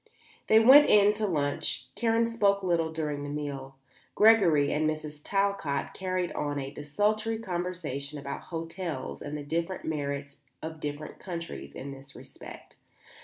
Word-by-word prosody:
They 220 Hz, -, +7 dB
went 265 Hz, +6 st, +9 dB
in 205 Hz, 0 st, +6 dB
to 210 Hz, 0 st, -1 dB
lunch. 145 Hz, -6 st, -1 dB
Karen 230 Hz, 0 st, +2 dB
spoke 200 Hz, -4 st, +2 dB
little 170 Hz, -3 st, +1 dB
during 150 Hz, -3 st, -3 dB
the 145 Hz, -, -5 dB
meal. 140 Hz, -2 st, -5 dB, 0.4 s
Gregory 180 Hz, -10 st, +5 dB
and 155 Hz, +1 st, +2 dB
Mrs. 155 Hz, -1 st, -5 dB
Talcott 195 Hz, -8 st, -1 dB
carried 185 Hz, -2 st, -2 dB
on 145 Hz, -1 st, -2 dB
a 135 Hz, -1 st, -4 dB
desultory 210 Hz, +10 st, 0 dB
conversation 175 Hz, -, -4 dB
about 140 Hz, -1 st, -6 dB
hotels 165 Hz, -4 st, -5 dB
and 150 Hz, +1 st, -5 dB
the 145 Hz, -, -6 dB
different 165 Hz, +5 st, -3 dB
merits 140 Hz, -2 st, -3 dB, 0.2 s
of 160 Hz, 0 st, -7 dB
different 150 Hz, 0 st, -6 dB
countries 170 Hz, -3 st, -7 dB
in 140 Hz, +1 st, -6 dB
this 135 Hz, 0 st, -12 dB
respect. -, -, -12 dB
160 Hz, 145 wpm, -29 LUFS, 145-195 Hz, 0.4 s, went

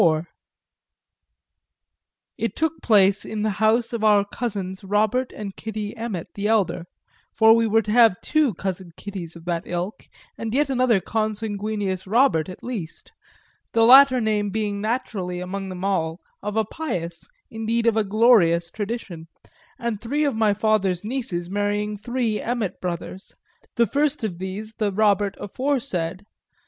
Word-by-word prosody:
IV 160 Hz, -1 st, +3 dB, 2.1 s
It 230 Hz, -, -3 dB
took 320 Hz, 0 st, -1 dB
place 200 Hz, -3 st, +4 dB
in 215 Hz, -1 st, -4 dB
the 215 Hz, -, +1 dB
house 225 Hz, +2 st, +3 dB
of 230 Hz, -2 st, -2 dB
our 205 Hz, -2 st, +5 dB
cousins 200 Hz, -4 st, -4 dB
Robert 215 Hz, +6 st, +1 dB
and 200 Hz, -2 st, -7 dB
Kitty 215 Hz, -1 st, -5 dB
Emmet 220 Hz, -7 st, -5 dB
the 205 Hz, +1 st, -2 dB
elder 205 Hz, -6 st, +1 dB, 0.5 s
for 220 Hz, 0 st, +6 dB
we 230 Hz, 0 st, +2 dB
were 225 Hz, +1 st, +3 dB
to 210 Hz, -, -3 dB
have 225 Hz, -5 st, +5 dB
two 300 Hz, -, +1 dB
cousin 185 Hz, -2 st, -4 dB
Kittys 185 Hz, -5 st, -7 dB
of 170 Hz, 0 st, -12 dB
that 170 Hz, -1 st, -1 dB
ilk 180 Hz, +4 st, -4 dB, 0.3 s
and 225 Hz, +1 st, -3 dB
yet 290 Hz, 0 st, +2 dB
another 250 Hz, -5 st, +3 dB
consanguineous 210 Hz, -2 st, -2 dB
Robert 215 Hz, -, +3 dB
at 185 Hz, -, -10 dB
least; 205 Hz, -10 st, -6 dB, 0.6 s
the 225 Hz, 0 st, +4 dB
latter 260 Hz, +1 st, +8 dB
name 210 Hz, -2 st, 0 dB
being 205 Hz, -1 st, -2 dB
naturally, 205 Hz, -6 st, -2 dB
among 190 Hz, +2 st, -5 dB
them 185 Hz, 0 st, -5 dB
all, 165 Hz, -4 st, -1 dB, 0.2 s
of 210 Hz, +1 st, -4 dB
a 220 Hz, -, +2 dB
pious, 175 Hz, -, -5 dB, 0.2 s
indeed 225 Hz, +1 st, -1 dB
of 230 Hz, -2 st, +3 dB
a 220 Hz, -, +2 dB
glorious, 195 Hz, -6 st, +4 dB
tradition, 200 Hz, -6 st, -5 dB, 0.5 s
and 235 Hz, -3 st, -3 dB
three 285 Hz, +6 st, -1 dB
of 280 Hz, -5 st, +1 dB
my 220 Hz, -1 st, +3 dB
father's 205 Hz, -4 st, +1 dB
nieces 215 Hz, -7 st, -3 dB
marrying 205 Hz, +2 st, -1 dB
three 230 Hz, 0 st, -2 dB
Emmet 230 Hz, -6 st, -3 dB
brothers, 180 Hz, +2 st, -6 dB, 0.4 s
the 235 Hz, -, +4 dB
first 290 Hz, +1 st, 0 dB
of 180 Hz, -6 st, -3 dB
these 200 Hz, +4 st, -5 dB
the 210 Hz, -2 st, +1 dB
Robert 205 Hz, -1 st, +2 dB
aforesaid. 205 Hz, -, -2 dB
210 Hz, 150 wpm, -23 LUFS, 190-230 Hz, 2.1 s, latter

